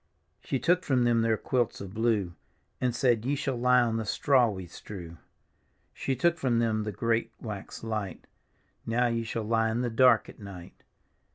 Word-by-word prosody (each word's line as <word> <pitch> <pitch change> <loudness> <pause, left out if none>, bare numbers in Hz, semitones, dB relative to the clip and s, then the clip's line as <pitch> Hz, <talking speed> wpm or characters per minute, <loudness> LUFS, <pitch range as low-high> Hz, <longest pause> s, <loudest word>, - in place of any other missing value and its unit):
She 135 - -2
took 175 +8 +2
from 130 -3 +2
them 120 -1 +3
their 115 -1 +2
quilts 120 +2 -1
of 95 -1 -8
blue. 110 -5 0 0.5
And 125 -2 0
said, 120 -3 +2
" - - -2
Ye 145 - +1
shall 135 -2 -2
lie 125 +1 +4
on 115 -2 0
the 110 - -2
straw 130 0 +3
we 95 -3 -6
strew." 85 -2 -10 0.7
She 135 - -2
took 170 +6 +1
from 125 -5 +1
them 110 -2 +1
the 105 - -2
great 115 +3 0
wax 105 -3 -7
light, 110 -4 -4 0.3
" - - -41
Now 120 +2 +2
ye 115 -1 0
shall 115 0 -3
lie 115 +1 +1
in 115 +2 -1
the 120 -1 -1
dark 115 -2 +5
at - - -13
nig^t." 100 -4 -9
115 Hz, 195 wpm, -28 LUFS, 110-125 Hz, 0.7 s, dark